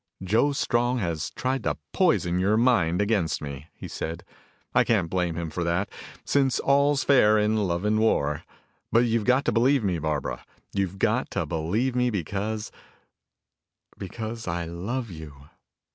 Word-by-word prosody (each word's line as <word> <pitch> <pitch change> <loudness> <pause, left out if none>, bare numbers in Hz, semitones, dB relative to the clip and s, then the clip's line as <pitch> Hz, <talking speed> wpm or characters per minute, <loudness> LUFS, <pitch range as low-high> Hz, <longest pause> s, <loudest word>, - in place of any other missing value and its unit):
"Joe 110 +10 +2
Strong 120 -2 +1
has 85 -8 -2
tried 130 0 -2
to - - -1 0.2
poison 85 +1 +2
your 100 +4 +2
mind 105 -7 +3
against 100 -7 0
me," 70 0 -7
he - - -8
said. 80 +2 -5 0.5
"I - - +5
can't 95 -8 +1
blame 90 -3 0
him 85 -1 -4
for 85 - -2
that, 85 +4 -1 0.3
since 135 -2 +2
all's 140 0 +3
fair 110 -6 +5
in 105 +1 +2
love 85 +3 -2
and 110 +1 +2
war. 75 -9 +1 0.5
But 115 - +5
you've 115 -2 0
got 130 +2 +3
to - - +2
believe 130 +2 +3
me, 90 -4 0
Barbara. 75 -1 -3 0.3
You've 95 -1 -1
got - - +1
to - - +1
believe 100 +11 -1
me 125 0 +2
because 105 +2 -3 1.2
because 110 +3 -6
I 85 0 -2
love 100 +8 -4
you. 80 -3 -9
105 Hz, 160 wpm, -26 LUFS, 85-120 Hz, 1.2 s, I